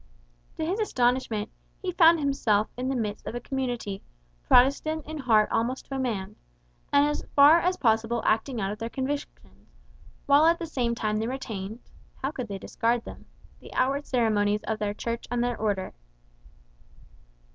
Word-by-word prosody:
To 315 - -2
his 370 +7 -1
astonishment, 245 - 0 0.3
he 370 - -3
found 335 -1 +6
himself 230 -7 +1
in 255 +1 -3
the 270 - -1
midst 215 -4 -3
of - - -4
a - - -2
community, 245 -7 -4 0.5
Protestant 280 +5 +3
in 310 0 -6
heart 220 -5 +4
almost 245 +3 -1
to 270 - -6
a - - -2
man, 215 -7 -3 0.6
and 285 0 +5
as 295 - -2
far 290 +4 +8
as 360 +2 0
possible 225 0 +1
acting 225 +3 +1
out 205 +1 -3
their 230 0 -4
convictions; 275 +3 -6 0.5
while 290 +3 +5
at 335 +1 +4
the 340 - -5
same 245 -7 -1
time 215 -1 -1
they 220 - -1
retained 225 -4 -5 0.3
(how 270 - -3
could 255 -6 -5
they 200 -2 -5
discard 230 +4 -1
them?) - - -11 0.3
the - - -13
outward 275 +3 0
ceremonies 210 -4 +1
of 220 -1 -3
their 205 -1 -2
Church 230 +2 -4
and 245 0 0
their 245 0 -1
Order. 205 -4 -2
245 Hz, 170 wpm, -27 LUFS, 220-280 Hz, 0.6 s, far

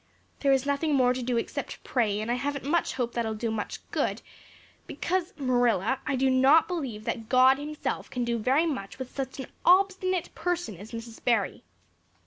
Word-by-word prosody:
There 275 - +3
is 270 0 +3
nothing 285 +2 +1
more 250 -2 +4
to 255 - -4
do 245 0 0
except 230 - -3
to - - -15
pray 215 -5 0
and 215 +2 -2
I - - +3
haven't 275 +2 -3
much 335 +4 +1
hope 245 -2 -2
that 235 - 0
that'll 220 -1 -2
do 225 +1 -2
much 215 -2 -5
good - - -1 0.6
because, 370 0 -2
Marilla, 245 - +2
I - - +1
do 265 +1 +2
not 270 +5 +5
believe 270 - -4
that 225 0 -4
God 260 +1 +6
Himself 300 +1 -4
can 250 - -2
do 235 -1 -1
very 265 +9 +3
much 260 -12 -4
with 260 -1 -8
such 270 -1 -4
an 265 - -4 0.2
obstinate 370 -1 +3
person 350 - -2
as 205 +5 -10
Mrs. 230 0 -8
Barry." 240 -1 +1
260 Hz, 195 wpm, -27 LUFS, 235-295 Hz, 0.6 s, God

